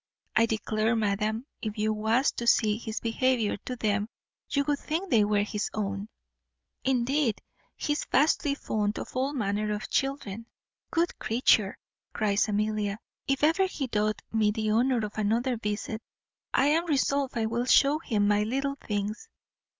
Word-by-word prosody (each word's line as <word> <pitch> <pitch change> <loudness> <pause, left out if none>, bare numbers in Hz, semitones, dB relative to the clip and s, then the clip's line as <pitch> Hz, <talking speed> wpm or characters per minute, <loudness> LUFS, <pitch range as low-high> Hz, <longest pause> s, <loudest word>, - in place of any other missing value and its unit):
I 230 +1 +5
declare, 220 +1 0
madam, 215 +2 0 0.2
if 215 0 -4
you 215 +1 +1
was 220 +6 +2
to 235 - -5
see 215 -2 +4
his 220 -2 -4
behaviour 230 -1 +1
to 255 - -3
them, 210 -2 0 0.4
you 280 - +1
would 290 0 0
think 345 +5 -3
they 225 -4 +5
were 205 0 +2
his 210 0 -2
own. 200 0 -3 0.7
Indeed 260 -2 +1 0.4
he 295 - -1
is 295 - -3
vastly 285 +1 +3
fond 210 -5 -1
of - - -7
all 265 +2 +1
manner 210 -5 -1
of 210 0 -4
children." 235 -6 -2 0.4
"Good 340 +1 0
creature!" 220 -3 +2 0.4
cries 210 -1 +1
Amelia; 210 -1 0 0.3
"if 275 0 0
ever 330 +5 +4
he 295 -7 -3
doth 215 -3 0
me 220 -2 +3
the 215 0 -1
honour 240 0 +2
of 210 +1 -6
another 235 +5 +1
visit 215 0 -3 0.5
I - - +3
am 330 +3 +2
resolved 280 -3 +1
I 225 - +1
will 235 +2 -1
shew 280 +3 +5
him 210 -9 +1
my 205 0 +3
little 275 +6 -1
things. 210 - -3
225 Hz, 160 wpm, -28 LUFS, 210-270 Hz, 0.7 s, I